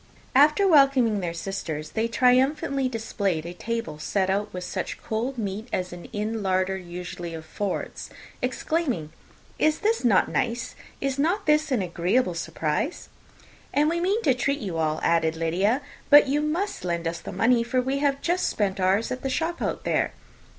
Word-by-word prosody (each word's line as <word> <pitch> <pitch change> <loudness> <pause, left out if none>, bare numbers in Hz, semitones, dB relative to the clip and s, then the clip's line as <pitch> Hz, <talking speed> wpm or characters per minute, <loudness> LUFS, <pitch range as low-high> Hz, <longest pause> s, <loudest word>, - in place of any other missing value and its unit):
After 300 +9 +5
welcoming 275 - +5
their 175 -3 -2
sisters, 170 -4 -5
they 225 +1 0
triumphantly 265 +3 +2
displayed 200 -8 -2
a 175 - -6
table 230 -6 -4
set 190 +4 0
out 205 +2 -1
with 180 0 -5
such - - -4
cold 240 +4 -3
meat 210 +1 -4
as 180 -1 -2
an 175 -1 -9
inn 215 +2 -3
larder 190 0 +1
usually 175 -1 -6
affords, 180 +5 -4 0.3
exclaiming, 255 - -1 0.5
"Is 310 +5 +2 0.2
not 220 -6 +4
this - - -9
nice? 235 +1 -1 0.3
is 275 0 -1
not 365 +7 +1
this 300 0 +3
an 235 -7 +2
agreeable 180 +4 +1
surprise?" 165 - -2 0.6
"And 300 +2 +3
we 340 - 0
mean 395 +6 +1
to 275 - +4
treat 280 +3 -1
you 190 - -4
all," 155 -1 0
added 165 -1 +2
Lydia; 190 - +1 0.3
"but 290 -1 +8
you 290 +2 +1
must 330 - -2
lend 170 -2 -1
us 170 +1 -3
the - - -8
money, 240 +1 +3
for 240 +2 0
we 265 +2 0
have 280 -1 +1
just 350 +2 +1
spent 195 -2 -1
ours 190 +4 +2
at 255 0 -3
the 270 - -2
shop 325 +5 -2
out - - -2
there." - - 0
225 Hz, 170 wpm, -25 LUFS, 180-275 Hz, 0.6 s, but